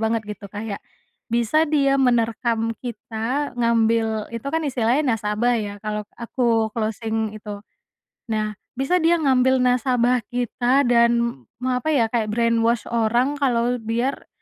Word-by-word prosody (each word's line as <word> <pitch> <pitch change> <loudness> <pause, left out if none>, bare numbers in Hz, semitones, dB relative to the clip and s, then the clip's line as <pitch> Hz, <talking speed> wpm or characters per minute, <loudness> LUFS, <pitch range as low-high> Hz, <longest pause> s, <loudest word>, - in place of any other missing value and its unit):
banget 225 0 0
gitu 205 -1 -8
kayak, 205 0 -6 0.5
bisa 240 +7 +2
dia 275 -2 +2
menerkam 230 -2 +1
kita 240 +4 -3
ngambil 225 -1 +1
itu 230 +3 -6
kan 320 +1 -1
istilahnya 260 +1 +1 0.2
nasabah 215 +3 +1
ya 205 -1 -5
kalau 210 0 -2 0.2
aku 230 -2 0
closing 220 -1 -2
itu. 205 -1 -7 0.7
Nah 215 -2 -2 0.2
bisa 270 +8 +1
dia 335 +1 +4
ngambil 260 -4 +3
nasabah 250 0 +2
kita 245 +2 +1
dan 235 - +2 0.2
me 255 - 0
apa 310 - -7
ya 240 -8 +2
kayak 225 -3 0
brainwash 230 -1 +2
orang 240 +5 +1
kalau 245 -2 +1
biar, 235 +5 -2
235 Hz, 135 wpm, -22 LUFS, 220-255 Hz, 0.7 s, dia